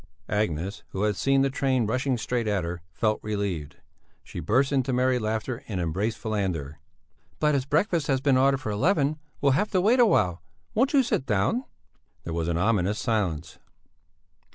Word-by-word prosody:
Agnes, 100 -2 -1
who 95 - -1
had 105 -1 +1
seen 135 +5 +2
the 135 - +2
train 130 -3 +1
rushing 130 +3 0
straight 120 0 -2
at 100 -4 0
her, 85 +1 -5
felt 110 +4 0
relieved; 100 -9 -3 0.5
she - - -8
burst 130 - +2
into 135 -1 +1
merry 125 0 +2
laughter 110 +4 -3
and 100 -4 -3
embraced 95 +7 -1
Falander. 90 - -3 0.6
"But 150 -1 +3
as 135 -2 0
breakfast 160 +2 +1
has 135 -2 +2
been 135 0 +3
ordered 135 +1 +3
for 110 - -3
eleven, 150 - +1 0.2
we'll 140 - +4
have 160 +11 +1
to 185 - +4
wait 230 +7 +4
a 240 - +7
while. 90 - +2 0.3
Won't 260 +6 +2
you 275 -2 +5
sit 140 - -1
down?" 110 - +1 0.6
There 85 - -5
was 85 -1 -1
an 85 -1 0
ominous 105 +1 +1
silence. 90 -9 -2
115 Hz, 175 wpm, -26 LUFS, 95-135 Hz, 0.6 s, a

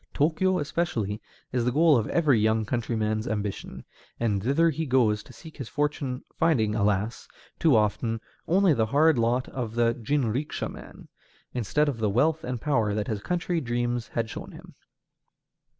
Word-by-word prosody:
Tōkyō 180 +5 +2
especially 125 - -2 0.3
is 125 -2 0
the 125 - +1
goal 155 +3 +5
of 115 -4 +1
every 145 -9 +3
young 110 +1 +2
countryman's 110 -2 -1
ambition, 105 -2 -4 0.3
and 105 -4 0
thither 150 +9 +3
he 160 +1 -3
goes 115 -5 +3
to - - -15
seek 160 -2 -13
his 135 -6 -6
fortune, 145 -3 -2
finding, 125 -11 +2
alas! 105 +1 0 0.3
too 160 -6 +4
often, 110 +1 +1 0.3
only 185 0 +4
the 110 -5 +1
hard 145 +2 +4
lot 120 +2 +1
of 115 -4 -5
the 115 0 +3
jinrikisha 125 +2 -1
man, - - -12 0.5
instead 130 +5 +1
of 135 -5 -2
the 110 -2 +1
wealth 155 +9 +2
and 125 -1 -3
power 110 -7 +1
that 105 -1 -2
his 105 -2 -2
country 175 +1 -1
dreams 120 -1 -1
had 115 -1 -2
shown - - -8
him. - - -13
120 Hz, 165 wpm, -26 LUFS, 110-150 Hz, 0.5 s, goal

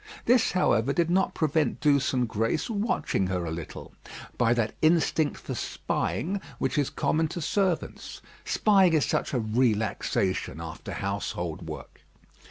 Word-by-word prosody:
This, 245 -1 +4
however, 140 -7 +2
did 170 +1 +1
not 190 +2 +2
prevent 155 -4 +1
Douce 140 -3 +3
and 125 -2 +1
Grace 115 - -1
watching 200 - 0
her 90 -2 -2
a 80 - -3
little, 80 -1 -7 0.4
by 115 -1 +2
that 110 -2 0
instinct 155 -2 +2
for - - -6
spying 190 +5 -2 0.2
which 130 0 -1
is 145 -3 +1
common 160 +1 0
to 170 - -5
servants; 185 +2 -1 0.2
spying 195 -5 +4
is 155 -3 +3
such - - -1
a 130 - 0
relaxation 110 - 0
after 80 -1 -7
household 95 -4 -3
work. - - -9
140 Hz, 145 wpm, -27 LUFS, 110-170 Hz, 0.4 s, This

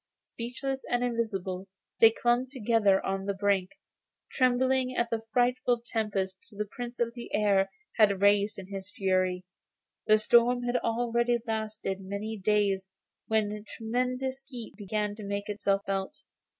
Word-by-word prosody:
Speechless 265 +3 -5
and 245 0 +1
invisible 195 -6 -2 0.3
they 225 - +9
clung 240 +3 +1
together 225 -6 +2
on 195 0 -2
the 200 0 -1
brink, 195 -2 +1 0.6
trembling 255 0 +2
at 235 -1 0
the 225 -1 0
frightful 245 0 +2
tempest 210 -1 -2
the 210 0 -4
Prince 240 +3 -7
of 235 -1 0
the 240 -1 -9
Air 200 -2 +3 0.3
had 200 -4 +5
raised 205 +1 +3
in 195 - -7
his 190 -1 -6
fury. 185 -2 0 0.6
The 215 - +7
storm 240 +2 +4
had 245 0 +1
already 235 +1 +1
lasted 215 -3 -3
many 200 +3 -4
days 200 -1 +1 0.4
when 210 -1 0
tremendous 255 +3 -2
heat 245 -5 -8
began 210 0 -2
to 215 - -8
make 200 0 -3
itself 200 -1 0
felt. 195 +9 -3
215 Hz, 140 wpm, -29 LUFS, 200-245 Hz, 0.6 s, they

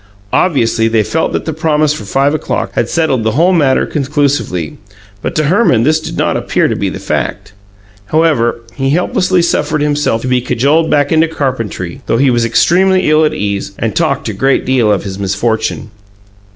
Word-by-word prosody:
Obviously, 115 -9 +2
they 110 -1 +2
felt 160 +9 -1
that - - -3
the 160 - -3
promise 155 -1 +1
for 110 - -7
five 135 +7 +1
o'clock 155 - -2
had - - -1
settled 155 -8 0
the 110 0 0
whole 170 +8 +3
matter 145 -6 +2
conclusively; 140 - -2 0.4
but - - -4
to 155 - +1
Herman 150 - +2
this 155 +4 +2
did 155 - -7
not - - 0
appear - - 0
to - - -1
be - - -2
the - - -6
fact. - - -3 0.5
However, 125 -4 +1
he 135 -1 -2
helplessly 180 +3 +1
suffered 155 -2 0
himself 145 -6 0
to - - -3
be 125 -1 +1
cajoled 140 +7 +1
back 145 -1 +1
into 160 0 +3
carpentry, 130 - -4
though - - +1
he 135 +1 +3
was 120 -1 +1
extremely 185 +8 +2
ill 155 +1 +4
at 155 - +1
ease 100 -1 -3
and 115 -2 -2
talked 155 -7 0
a 110 - -3
great 135 +7 +1
deal 125 -5 +2
of 100 - 0
his 95 -1 -6
misfortune. 110 +2 -2
135 Hz, 190 wpm, -13 LUFS, 115-155 Hz, 0.5 s, ill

